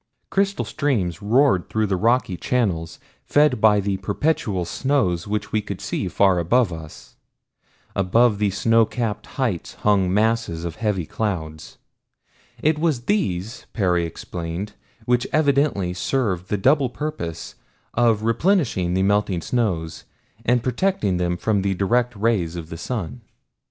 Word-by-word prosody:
Crystal 195 0 +1
streams 105 - -1
roared 115 -2 +3
through 110 0 +1
their 100 -2 0
rocky 115 0 +1
channels, 85 -7 -1 0.3
fed 145 -6 +3
by 105 -2 +5
the 100 -1 -1
perpetual 100 - -1
snows 95 - 0
which 105 0 -3
we 110 - +1
could 100 -2 -6
see 95 - -3
far 95 0 +3
above 100 +3 +2
us. 80 -1 -11 0.8
Above 105 +3 +3
the 105 -1 +2
snowcapped 115 +2 +1
heights 115 -11 -2
hung 100 -3 +3
masses 105 -5 0
of 85 0 -5
heavy 105 -6 -1
clouds. 80 -7 -4 0.9
It 155 0 +2
was 155 -6 +1
these, 115 - -2
Perry 90 -4 +1
explained, 85 +5 -6 0.3
which 125 +1 +1
evidently 140 - +2
served 95 -3 -1
the 105 - 0
double 135 +6 +3
purpose 85 - -5 0.4
of 115 -3 +2
replenishing 115 - +1
the 95 - +2
melting 100 -3 +1
snows 90 -8 -2 0.4
and 120 0 +2
protecting 125 - 0
them 90 0 -1
from 105 +1 0
the 95 0 0
direct 120 +6 +1
rays 100 -6 0
of 85 -2 -7
the 80 - -6
sun. 85 - -4
105 Hz, 135 wpm, -22 LUFS, 90-125 Hz, 0.9 s, by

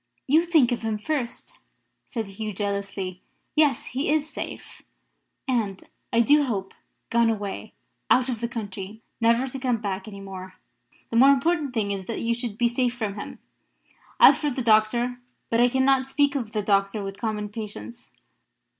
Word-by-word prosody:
"You 315 +5 +4
think 305 -8 +4
of 245 - -1
him 220 -1 -1
first," 290 - -4 0.5
said 230 -6 -3
Hugh, 210 +2 -5
jealously. 195 -2 -3 0.3
"Yes: 300 -3 +3
he 270 +3 -1
is 305 0 +2
safe; 315 - -8 0.7
and, 215 -7 -1 0.3
I 235 - +4
do 290 +5 +5
hope, 205 -8 -2 0.4
gone 235 0 +4
away, 205 -3 -4 0.4
out 255 0 +4
of 240 -3 -3
the 235 - 0
country, 210 -2 -6 0.2
never 230 +3 +4
to 270 0 -6
come 250 -2 +1
back 200 -2 -4
any 200 -2 -8
more. 190 -1 -9 0.6
The 230 - +1
more 265 +3 +8
important 280 -1 +2
thing 205 -3 0
is 195 -2 -4
that 230 - -4
you 230 0 +1
should 230 -3 -4
be 240 - +3
safe 245 0 0
from 215 -4 -2
him. 205 - -7 0.8
As - - +8
for 300 - 0
the 255 -2 -3
doctor 235 +3 +3 0.3
but 230 +1 +3
I 245 - +5
cannot 265 +1 +3
speak 285 +1 +2
of 240 -7 -3
the 210 -2 -1
doctor 200 +1 +1
with 195 0 -6
common 210 -2 -2
patience. 205 - -8
230 Hz, 170 wpm, -25 LUFS, 205-260 Hz, 0.8 s, more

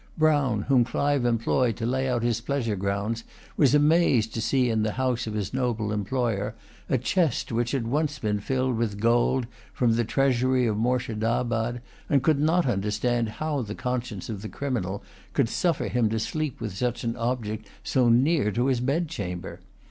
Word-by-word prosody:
Brown, 145 -9 +2
whom 130 -3 +4
Clive 140 +1 0
employed 115 0 +1
to 115 - -3
lay 130 +2 0
out 120 -2 0
his 115 -2 0
pleasure 120 -4 -1
grounds, 100 +4 -2 0.3
was 145 -1 +4
amazed 150 -7 +3
to 115 - -2
see 130 +2 +2
in 110 -2 +1
the 110 -1 0
house 125 -2 -1
of 110 - -4
his 100 -2 -3
noble 120 -5 -1
employer 105 0 -1 0.3
a 130 - +3
chest 150 +3 0
which 120 +1 0
had 130 -3 -1
once 150 +5 0
been 105 -5 -1
filled 130 +2 -1
with 110 -3 -1
gold 120 +3 +2 0.3
from 120 -3 +2
the 120 +1 +2
treasury 130 +1 +2
of 110 -3 +1
Moorshedabad, 120 0 0 0.3
and 140 -3 +3
could 150 -1 +3
not 165 +4 +3
understand 110 +1 0
how 150 +4 -2
the 105 -2 -5
conscience 125 -6 -3
of 105 -4 -5
the 110 - -6
criminal 105 -9 -3 0.3
could - - +2
suffer 170 +3 0
him 120 -3 +1
to 110 +1 -1
sleep 155 +3 -3
with 110 -5 -5
such 120 +3 -2
an 115 0 -1
object 115 -3 -3 0.2
so 125 -2 +2
near 130 -1 +3
to 120 +4 0
his 130 -2 +2
bedchamber. 125 - -3
120 Hz, 180 wpm, -26 LUFS, 110-130 Hz, 0.3 s, whom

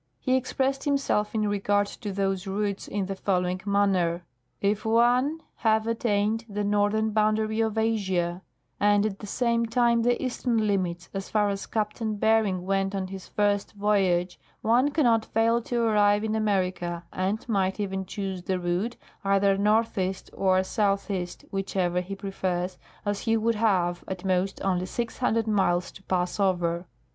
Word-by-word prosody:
He 255 -1 +1
expressed 270 +1 0
himself 275 -7 0
in 215 -1 +1
regard 205 0 +1
to 205 +1 -6
those 195 0 -1
routes 200 0 -2
in 200 -2 -2
the 195 +1 -4
following 185 -1 0
manner: 185 -4 +1 0.2
' 125 - -47
If 210 - -4
one 245 +7 +2
have 220 -1 +2
attained 225 -1 0
the 205 0 -2
northern 205 +2 +1
bound 215 0 +2
ary 220 0 0
of 220 -1 -1
Asia, 190 -6 0 0.4
and 205 0 +4
at 200 -2 -3
the 205 - -8
same 235 +1 +1
time 235 0 +3
the 240 +1 +2
eastern 240 -3 0
limits, 180 -4 -1
as 195 -1 -5
far 210 -1 +2
as 195 0 -4
Captain 215 0 -2
Ber 220 +1 +4
ing 185 -2 -2
went 195 0 0
on 190 -1 -3
his 190 -1 -8
first 205 -1 0
voyage, 190 -4 +1 0.2
one 240 +6 +4
cannot 240 -7 +3
fail 230 +2 +2
to 235 0 -1
arrive 210 -2 +3
in 220 -1 -1
America, 185 -5 -1
and 195 +5 -2
might 195 -3 0
even 190 -2 -2
choose 190 -1 -4
the 185 +1 -1
route, 180 +7 -1 0.3
either 195 0 +3
northeast 200 -2 0
or 185 -1 +2
southeast, 195 -3 -1
whichever 185 -2 0
he 195 +2 -6
prefers, 190 -2 -3 0.3
as 205 -1 -1
he 225 -1 +1
would 230 +1 +1
have, 185 -6 +1
at 190 -1 -5
most, 185 +1 0
only 185 -1 0
600 230 0 -1
miles 190 -5 +1
to - - -14
pass 180 +1 -1
over. 175 -3 0
205 Hz, 165 wpm, -26 LUFS, 190-220 Hz, 0.4 s, and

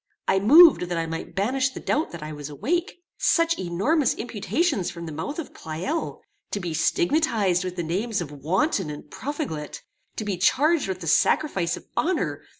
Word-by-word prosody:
I 190 - +3
moved 310 - +8
that 175 - -1
I 165 - 0
might 165 0 -6
banish 260 +7 +1
the 260 - -8
doubt 305 +2 0
that 170 -3 -8
I 155 0 -6
was 145 -1 -7
awake. 345 - -2 0.2
Such 335 -1 +2
enormous 215 - +1
imputations 230 - -1
from 170 -1 -8
the 160 - -6
mouth 160 - -5
of 330 - -6
Pleyel! 175 - -4 0.3
To 205 - -3
be 175 -4 -4
stigmatized 185 - +1
with 180 -1 -4
the 175 - -2
names 200 +7 -1
of 165 -4 -5
wanton 170 - 0
and 150 -1 -9
profligate! 270 - -5 0.3
To 215 - -4
be 200 -3 -2
charged 290 - +3
with 185 -1 -4
the 165 - -6
sacrifice 190 - +2
of - - -13
honor! 355 +1 0
195 Hz, 180 wpm, -25 LUFS, -, 0.3 s, moved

